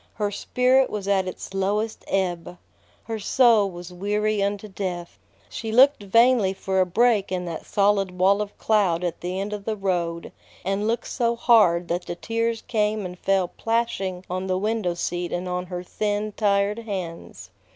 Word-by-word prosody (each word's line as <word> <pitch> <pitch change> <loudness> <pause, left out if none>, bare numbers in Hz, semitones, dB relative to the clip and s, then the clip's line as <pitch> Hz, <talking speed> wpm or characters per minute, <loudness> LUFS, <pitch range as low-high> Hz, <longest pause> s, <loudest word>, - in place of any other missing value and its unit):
Her 205 -2 -1
spirit 255 +5 +2
was 200 -2 -5
at 190 -2 +2
its 185 - -7
lowest 205 +3 -1
ebb. 180 -2 -2 0.5
Her 225 -1 -4
soul 225 -2 +4
was 175 0 -9
weary 210 +3 0
unto 200 +1 -1
death. 185 -3 -5 0.3
She 225 -1 -5
looked 265 +2 +5
vainly 230 0 +4
for 190 0 -1
a 185 - +2
break 215 0 +2
in 180 -1 -2
that 165 -2 -6
solid 200 -3 +1
wall 195 +3 +4
of 205 -1 -6
cloud 190 -6 +2
at 175 -2 -3
the 180 +2 -3
end 200 +2 -3
of 205 -1 -5
the 220 +1 -2
road, 175 -4 -2 0.3
and 195 +2 0
looked 230 +1 -1
so 235 -2 0
hard 210 -8 +4
that 175 +1 -2
the 175 - -4
tears 230 +3 -2
came 215 -3 0
and 180 0 -7
fell 190 -2 +1
plashing 195 -6 -2
on 185 +1 -3
the 185 -1 0
window 210 -3 -1
seat 175 0 -3
and 180 +1 -3
on 180 0 -3
her 180 0 -5
thin, 210 +3 -2
tired 205 0 +1
hands. 170 - -7
200 Hz, 175 wpm, -24 LUFS, 180-215 Hz, 0.5 s, looked